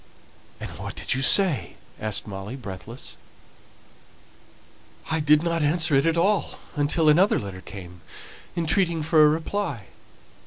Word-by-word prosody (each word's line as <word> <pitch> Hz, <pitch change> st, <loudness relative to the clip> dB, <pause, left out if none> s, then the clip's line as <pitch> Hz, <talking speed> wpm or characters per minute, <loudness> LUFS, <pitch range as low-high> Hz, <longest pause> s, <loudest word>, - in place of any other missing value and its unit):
"And -, -, -7 dB
what -, -, -6 dB
did -, -, -1 dB
you 130 Hz, -, -1 dB
say?" 180 Hz, +2 st, +3 dB, 0.2 s
asked 110 Hz, -1 st, -1 dB
Molly, 100 Hz, +3 st, -7 dB
breathless. 110 Hz, 0 st, -9 dB, 1.9 s
"I 160 Hz, -, +1 dB
did 150 Hz, +1 st, +4 dB
not 170 Hz, -1 st, 0 dB
answer 160 Hz, +1 st, +1 dB
it 140 Hz, +3 st, +4 dB
at 165 Hz, 0 st, +1 dB
all 200 Hz, +4 st, +1 dB, 0.2 s
until 150 Hz, +2 st, +1 dB
another 175 Hz, +7 st, +5 dB
letter 95 Hz, -2 st, -6 dB
came, 90 Hz, -3 st, -11 dB, 0.5 s
entreating 170 Hz, 0 st, +1 dB
for 155 Hz, 0 st, +5 dB
a 150 Hz, -, +7 dB
reply. 160 Hz, -, -3 dB
150 Hz, 130 wpm, -24 LUFS, 110-165 Hz, 1.9 s, a